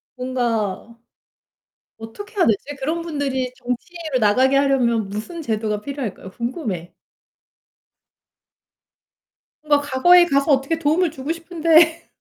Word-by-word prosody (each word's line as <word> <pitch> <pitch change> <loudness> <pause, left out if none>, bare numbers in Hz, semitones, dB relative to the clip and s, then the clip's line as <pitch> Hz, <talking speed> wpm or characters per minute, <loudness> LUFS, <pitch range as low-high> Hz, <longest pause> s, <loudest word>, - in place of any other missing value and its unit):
뭔가 235 -4 -2 1.0
어떻게 405 - -10
해야 370 - +3
되지? 270 +7 -1
그런 315 +5 -2
분들이 275 -6 -2
정치로 300 +4 -4
나가게 255 +6 +3
하려면 245 -6 +2
무슨 220 - -6
제도가 215 -3 -2
필요할까요? 245 -7 -6
궁금해. 230 - -5 2.7
뭔가 290 -1 +3
과거에 345 +6 +5
가서 280 -2 +1
어떻게 275 +4 +1
도움을 330 +3 +2
주고 285 +1 -5
싶은데. 330 -1 +2
270 Hz, 265 characters per minute, -21 LUFS, 230-325 Hz, 2.7 s, 과거에